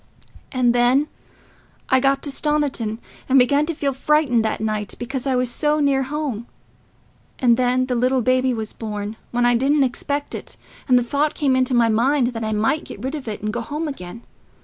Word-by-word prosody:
"And 250 -3 +2
then 250 +5 +3 0.8
I 260 - +4
got 275 +1 +1
to 285 - -3
Stoniton, 275 -7 -1 0.3
and 265 - +5
I 255 - +8
began 285 +4 +1
to 335 - -2
feel 280 -2 -1
frightened 270 -4 +2
that 220 - -1
night, 215 -1 -2
because 260 +2 -4
I 265 - +1
was 250 -1 0
so 300 +4 0
near 280 -2 +2
home. 270 -4 -3 0.9
And 240 -2 +4
then 255 +1 +1
the 255 - -2
little 250 +1 +1
baby 255 +1 +2
was 220 -3 -4
born, 210 -1 -5
when 245 0 +1
I 245 - +4
didn't 275 +4 +3
expect 285 +3 -2
it; - - -6 0.3
and 250 -2 +5
the 245 - +2
thought 285 +5 0
came 275 -3 +1
into 255 0 +1
my 235 -1 +4
mind 245 +3 +2
that 225 -2 -5
I 220 - -2
might 220 +9 +1
get 205 - -10
rid 265 +2 -3
of 290 -5 -6
it 210 -1 -5
and 215 0 -2
go 240 - -2
home 300 +6 -4
again. 230 -5 -8
255 Hz, 205 wpm, -21 LUFS, 235-280 Hz, 0.9 s, I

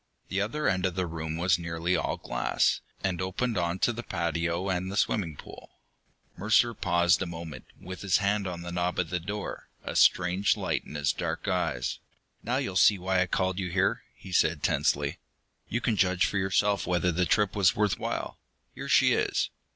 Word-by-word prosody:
The 95 +1 0
other 115 +8 -1
end 95 -2 +2
of 90 - -5
the 95 -1 0
room 80 -1 -4
was 90 +1 +2
nearly 85 +1 -1
all - - -1
glass, - - 0 0.2
and 95 -2 -1
opened 110 +6 -1
onto 90 +5 +1
the 120 0 -5
patio 85 -1 -2
and 95 0 -1
the 100 - -4
swimming 90 -7 0
pool. - - -13 0.6
Mercer 110 +4 +3
paused 85 -4 +2
a 95 - -1
moment, 80 -5 -8
with 95 0 -8
his 100 -2 +3
hand 100 -1 0
on 85 -2 -5
the 85 - -6
knob 90 +1 -1
of 85 -3 -1
the 90 - 0
door, 105 +4 -6
a - - -5
strange 90 +2 +3
light - - -1
in - - -10
his 70 -2 +1
dark - - -4
eyes. - - -1 0.4
"Now 125 +3 -1
you'll 130 -9 -3
see 105 - +6
why 95 0 +1
I 95 - +1
called 95 +1 0
you 95 -2 -2
here," 95 +2 +1
he 95 - -12
said 80 -3 +2
tensely. - - +1 0.5
"You 120 - -1
can 115 -3 0
judge 90 -1 +3
for 100 - -1
yourself 100 +1 +1
whether 90 0 +1
the 90 +1 0
trip 105 -3 +2
was 95 -4 +4
worth 105 -2 +1
while. - - -4 0.3
Here - - -7
she - - +5
is!" - - 0
90 Hz, 195 wpm, -28 LUFS, 85-100 Hz, 0.6 s, see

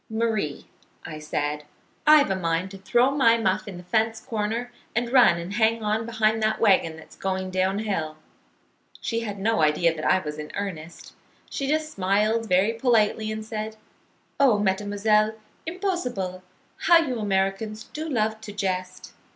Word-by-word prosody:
'Marie,' 220 -9 -1 0.4
I 155 -1 -7
said, 150 0 -3 0.4
'I've 300 -8 +7
a - - +1
mind 170 +1 -1
to 195 - -10
throw 240 +7 +3
my 235 -5 +4
muff 215 -1 0
in 190 -3 -7
the 175 - -10
fence 220 +4 0
corner 235 0 -3 0.2
and 235 +1 0
run 245 -9 +6
and 170 +3 -6
hang 225 +1 +2
on 215 +2 -1
behind 220 -1 +1
that 215 0 +1
wagon 190 -7 +3
that's 160 - -14
going 190 -1 -3
down 185 +1 +1
hill.' 165 -8 -2 0.8
She 230 - -2
had 210 -3 -5
no 210 -2 +1
idea 155 +2 +3
that 155 - -6
I - - +4
was 150 -4 -5
in 150 - -7
earnest. 170 -5 -6 0.4
She 275 - -3
just 310 +1 0
smiled 210 +3 +1
very 190 +5 +3
politely 225 -2 +1
and 215 0 -5
said, 215 0 -5 0.6
'Oh, 265 -7 +5
mademoiselle, 205 +2 +1 0.3
impossible! 255 - -3 0.4
How 345 - +5
you 270 -8 0
Americans 205 +1 -1
do 315 +2 -6
love 220 -4 -1
to 220 - -8
jest.' 185 -2 -4
215 Hz, 160 wpm, -25 LUFS, 185-230 Hz, 0.8 s, I've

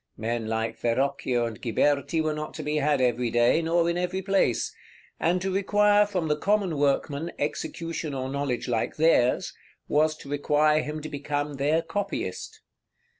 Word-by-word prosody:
Men 115 0 -2
like 110 0 -2
Verrocchio 125 0 0
and 115 -2 -6
Ghiberti 145 +7 +1
were 155 -1 0
not 150 -1 -6
to 155 - -5
be 150 +1 -1
had 145 -2 +2
every 125 -1 +1
day, 120 +7 +3
nor 165 +1 +2
in 170 +1 0
every 180 +1 -2
place; 195 - +1 0.5
and 175 +2 +2
to 190 -1 -1
require 205 +1 +4
from 180 -5 -2
the 150 - +2
common 190 -2 0
workman 145 +3 0
execution 160 0 -3
or 130 -1 -3
knowledge 135 -2 -2
like 115 -3 -1
theirs, 150 -6 +3 0.3
was 155 +1 +2
to 140 - -12
require 150 +1 +2
him 150 0 -5
to - - -4
become 145 0 -3
their 150 +4 +1
copyist. 205 +4 -4
150 Hz, 165 wpm, -26 LUFS, 130-165 Hz, 0.5 s, require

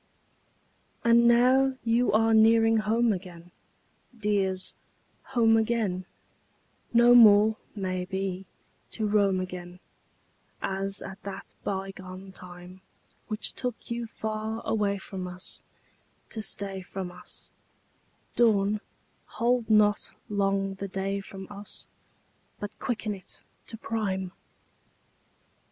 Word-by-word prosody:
IV 235 - +5
And 235 0 +6
now 260 +3 +4
you 235 +2 +2
are 225 +2 +4
nearing 225 0 +6
home 220 +1 +2
again, 175 -2 -9 0.7
Dears, 195 -3 0 0.5
home 230 -4 +4
again; 220 -5 0 0.8
No 240 +1 +6
more, 215 -2 +7 0.2
may 185 -2 -2
be, 190 0 -3 0.5
to 220 - -1
roam 200 -2 +3
again 180 -1 -6 0.8
As 195 +1 -2
at 195 0 -9
that 195 -1 -8
bygone 190 -1 -5
time, 180 0 -11 0.5
Which 215 -1 0
took 250 -2 -5
you 235 0 -2
far 220 0 -4
away 205 -2 +1
from 190 -1 -6
us 180 +1 -2 0.7
To 220 - -1
stay 195 -2 -2
from 185 0 -6
us; 180 - -10 0.8
Dawn, 210 -3 +3 0.6
hold 240 -1 +1
not 210 -1 +3
long 195 -1 +1
the 195 +1 -5
day 195 +1 -2
from 195 0 -9
us, 205 0 -8 0.7
But 205 - -7
quicken 220 -3 -2
it 190 -2 -8 0.3
to 225 - -7
prime! 195 -5 -2
205 Hz, 110 wpm, -28 LUFS, 190-225 Hz, 0.8 s, more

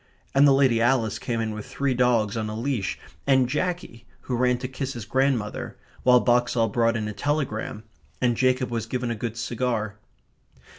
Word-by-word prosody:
And 140 +1 +6
the - - +6
Lady 135 -4 +4
Alice 115 -3 +2
came 115 -2 -2
in 110 -1 -1
with 105 -1 -7
three 140 -1 -1
dogs 120 -4 +2
on 110 -1 -2
a 110 +1 -4
leash, 120 -6 -1 0.3
and 130 -2 +4
Jackie, 150 -5 -3
who 125 - -3
ran 125 0 +2
to 130 +1 -4
kiss 135 +1 -4
his 115 -4 -7
grandmother, 130 -3 -1 0.2
while 125 0 +6
Boxall 120 -2 +2
brought 115 +1 +2
in 110 -1 -3
a 105 - -4
telegram, 110 -3 -2 0.4
and 120 -2 +2
Jacob 130 +1 +1
was 115 -1 -2
given 125 0 -2
a - - -2
good 115 +1 -4
cigar. 115 -3 -2
120 Hz, 185 wpm, -25 LUFS, 115-130 Hz, 0.4 s, And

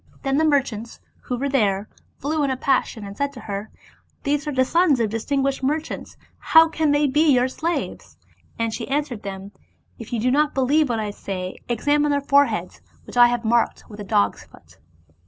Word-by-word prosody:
Then 270 -1 +1
the 315 - +3
merchants, 255 -7 0 0.3
who 250 - -2
were 275 +3 -1
there, 210 -7 +1 0.3
flew 300 +3 -1
in 280 - +1
a 260 - -1
passion, 250 -4 0
and 200 0 -8
said 280 +3 -1
to 250 - -10
her, 200 +1 -5 0.3
" - - -39
These 290 +1 -1
are - - -1
the 260 -2 +2
sons 330 -2 +3
of 220 -3 0
distinguished 270 +5 -1
merchants, 300 +4 -3 0.2
how 320 0 +6
then 325 - -3
can 310 -2 +1
they 290 +1 +3
be 295 +3 +3
your 250 -1 +3
slaves? 330 +6 -4 0.2
" - - -34
Then 230 -1 -1
she - - -5
answered 275 -5 -2
them, 195 0 -7 0.5
"If 230 - -9
you 240 - -1
do 250 +3 +1
not 295 +2 +2
believe 280 +2 +2
what 235 - 0
I 210 -1 -3
say, 185 -2 -6
examine 290 +5 +1
their 285 0 +2
foreheads 280 0 +1 0.2
which - - -12
I 245 0 +6
marked 235 +1 +1
with 210 - -10
a - - -5
dog's 205 0 +1
foot." - - -20
265 Hz, 205 wpm, -22 LUFS, 225-290 Hz, 0.5 s, how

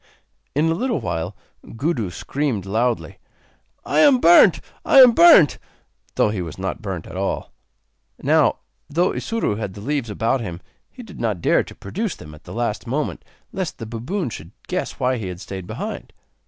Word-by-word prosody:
In 150 +2 +2
a 165 - +2
little 235 - -1
while 90 -2 -3 0.4
Gudu 120 - -1
screamed 120 +2 -3
loudly: 115 +5 -1 0.7
'I - - +1
am 285 -4 +6
burnt! 175 -5 +6 0.2
I - - +3
am 255 -2 +10
burnt!' 270 - +7 0.6
though - - +3
he 100 -4 -3
was 85 -3 -7
not 95 0 -4
burnt 95 -6 -5
at - - -10
all. 95 +1 -3 0.7
Now, - - +3 0.3
though 175 +5 +1
Isuro 225 - -2
had 105 -4 -5
the - - -9
leaves 140 -1 -2
about 115 +5 0
him, 85 -6 -6 0.3
he 250 - -12
did 205 -5 -12
not 110 -6 -1
dare - - +2
to - - -12
produce 205 - -4
them 75 - -12
at 75 0 -16
the - - -10
last 120 0 -3
moment 145 +5 -2 0.3
lest 185 -3 -4
the 115 - -7
baboon 125 - -4
should 85 +1 -9
guess 180 0 -3
why 130 -1 +1
he 105 -5 -5
had 90 -1 -6
stayed 95 -1 -7
behind. - - -6
120 Hz, 180 wpm, -21 LUFS, -, 0.7 s, am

